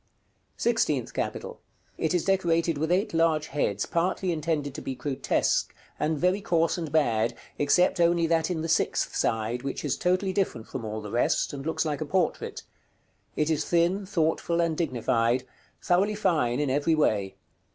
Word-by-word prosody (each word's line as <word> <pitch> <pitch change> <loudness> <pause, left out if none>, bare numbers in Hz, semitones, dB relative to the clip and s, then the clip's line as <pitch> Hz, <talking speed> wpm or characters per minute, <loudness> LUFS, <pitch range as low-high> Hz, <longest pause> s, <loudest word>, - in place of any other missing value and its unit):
§ - - -45 0.5
CIV. - - -13
SIXTEENTH 145 - 0
CAPITAL. - - -4 0.4
It 160 +2 +1
is 175 - 0
decorated 170 -5 +1
with 160 +2 -1
eight 190 +3 +1
large 165 -2 +2
heads, 105 -8 -1
partly 180 +2 0
intended 155 -3 -2
to - - -7
be 135 - -4
grotesque, 130 +2 0 0.2
and 155 +1 0
very 180 +6 +1
coarse 165 -3 +1
and 165 -5 -4
bad, 120 -7 +2 0.2
except 175 +6 +3
only 170 0 +3
that 165 0 +1
in 165 -3 -2
the - - -2
sixth 160 0 0
side, 115 +2 0
which 135 +1 -4
is - - 0
totally 185 +1 +1
different 180 - -1
from 125 - -6
all 110 0 -4
the 105 -1 -8
rest, 120 +4 +1
and 140 +1 -6
looks 160 - 0
like 150 -1 -2
a - - -1
portrait. 175 +3 -1 0.7
It 150 +1 +1
is 155 -1 +1
thin, 175 +3 +1
thoughtful, 170 -2 0
and 170 -2 +1
dignified; 125 -5 +1 0.4
thoroughly 195 +4 +2
fine 155 - +1
in 145 -3 0
every 145 +4 +2
way. 100 -10 +1
160 Hz, 175 wpm, -27 LUFS, 135-175 Hz, 0.7 s, except